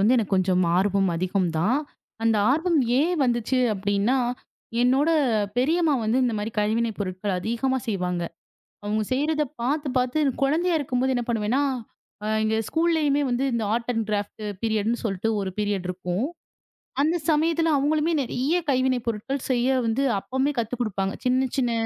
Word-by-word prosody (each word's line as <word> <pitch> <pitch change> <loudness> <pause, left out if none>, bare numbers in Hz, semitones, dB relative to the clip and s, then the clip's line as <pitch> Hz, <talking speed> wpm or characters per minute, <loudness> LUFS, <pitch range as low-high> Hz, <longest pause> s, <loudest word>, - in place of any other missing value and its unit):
வந்து 220 +6 +4
எனக்குக் 210 -4 +1
கொஞ்சம் 185 -1 +2
ஆர்வம் 195 0 +2
அதிகம் 185 +1 0
தான். 220 - +2 0.4
அந்த 225 -1 +3
ஆர்வம் 325 +3 +2 0.2
ஏன் 345 +5 +2
வந்தது 240 +1 0 0.2
அப்படி 200 +1 -2
என்றால் 245 +3 +2 0.5
என்னோட 270 +6 +3 0.5
பெரியம்மா 310 +4 +2
வந்து 225 +4 +2
இந்த 245 - +1
மாதிரி 210 +2 -3
கைவினை 225 +2 +1
பொருட்கள் 185 0 -2
அதிகமாக 250 +5 -1
செய்வாங்க. 180 -4 -1 0.6
அவங்க 215 +1 0
செய்யறதை 300 +3 +1 0.2
பார்த்துப் 275 +1 -1
பார்த்து 255 +4 +1 0.2
குழந்தையாக 320 +5 +2
இருக்கும்போது 260 -1 0
என்ன 245 - 0
பண்ணுவேன் 225 0 0
என்றால், 230 -5 -3
எங்க 220 0 +1
ஸ்கூலிலேயுமே 320 -3 +2
வந்து 245 +2 0
இந்த 230 -2 0
ஆர்ட் 235 +1 -2
அண்ட் 225 -1 0
கிராஃப்ட் 205 +1 -3 0.2
பீரியட் 220 -2 0
என்று 235 - -2
சொல்லிட்டு 200 +1 -1
ஒரு 195 -1 -2
பீரியட் 205 -3 -1
இருக்கும். 180 +4 -2 0.8
அந்தச் 315 +1 0
சமயத்தில் 325 +2 +2
அவங்களுமே 305 +4 +1
நிறைய 265 +5 -1
கைவினை 255 -1 +2
பொருட்கள் 235 +5 -3
செய்ய 245 0 +1 0.2
வந்து 230 +4 +1 0.2
அப்பவே 265 +7 -1
கத்துக் 235 +2 -3
கொடுப்பாங்க. 195 -3 -1
சின்ன 255 +1 +2
சின்ன 245 -3 +1
240 Hz, 155 wpm, -25 LUFS, 210-275 Hz, 0.8 s, வந்து